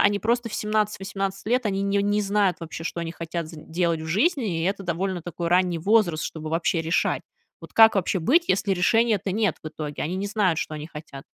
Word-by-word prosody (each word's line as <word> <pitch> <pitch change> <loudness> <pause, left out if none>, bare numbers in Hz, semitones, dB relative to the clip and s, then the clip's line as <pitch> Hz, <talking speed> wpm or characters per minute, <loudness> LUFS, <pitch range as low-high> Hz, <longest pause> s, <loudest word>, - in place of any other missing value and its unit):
они 205 0 +4
просто 235 +1 0
в - - -7
17-18 195 -2 -2
лет- 245 +1 +1
они 195 -1 -1
не 200 0 +1
не 205 +1 +1
знают 200 -2 +1
вообще, 160 -2 -7
что 170 +1 -4
они 165 0 -4
хотят 165 -1 -5
з 160 0 -11
делать 165 +1 -1
в 160 - -6
жизни, 210 - +1
и - - 0
это 195 +1 -1
довольно 180 +1 -2
такой 170 0 -4
ранний 180 -1 +2
возраст, 180 -4 +2
чтобы 155 -1 -5
вообще 165 +1 0
решать. 165 +2 +1 0.4
Вот - - -12
как 225 0 +8
вообще 185 0 0
быть, 330 - +3
если 195 +1 +2
решения-то 205 +2 +2
нет 210 -4 +1
в 155 - -5
итоге? 155 -1 -6
Они 175 +5 -2
не 195 +2 -2
знают, 195 -6 +1
что - - -3
они 150 0 -6
хотят. 150 -4 -10
185 Hz, 215 wpm, -24 LUFS, 165-210 Hz, 0.4 s, как